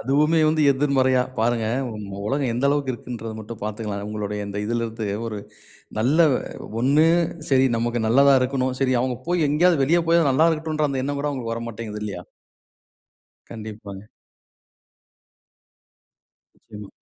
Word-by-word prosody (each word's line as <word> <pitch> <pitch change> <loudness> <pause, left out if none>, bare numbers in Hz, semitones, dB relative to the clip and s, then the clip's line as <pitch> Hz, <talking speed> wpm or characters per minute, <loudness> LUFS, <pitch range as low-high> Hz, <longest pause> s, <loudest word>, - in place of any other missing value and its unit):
அதுவுமே 150 +6 +2
வந்து 155 0 +2
எதிர்மறையா 130 -2 +2 0.2
பாருங்க! 115 0 +1 0.2
உம் 105 -2 -7
உ - - -8
உலகம் 135 -1 0
எந்த 125 +3 -1
அளவுக்கு 140 -2 0
இருக்குன்றத 115 -2 -7
மட்டும் 110 +1 -9
பாத்துக்கலாம். 105 -1 -4
உங்களுடைய 105 -1 -4
இந்த 100 0 -5
இதுல 115 +1 -1
இருந்து 110 -1 -5 0.2
ஒரு, 110 -2 -4 0.6
நல்ல 135 +9 +2 0.6
ஒண்ணு 145 +6 +4 0.4
சரி 135 -1 +4
நமக்கு 120 0 -1
நல்லதா 140 +4 +5
இருக்கணும் 130 0 -1
சரி 130 -1 +2
அவுங்க 125 0 -1
போய் 175 -2 +2
எங்கேயாவது, 160 0 +3
வெளிய 170 +5 +3
போயாவது 165 -4 +4
நல்லா 155 +5 +4
இருக்கட்டுன்ற 155 -1 -1
அந்த 130 -1 -2
எண்ணம் 145 0 -2
கூட 145 - -1
அவுங்களுக்கு 120 -5 -4
வரமாட்டேங்குது 115 -2 -6
இல்லையா? 95 -4 -5 1.3
கண்டிப்பாங்க. 105 -3 -8 2.5
நிச்சயமா. 105 -1 -12
125 Hz, 140 wpm, -23 LUFS, 110-140 Hz, 2.5 s, நல்லதா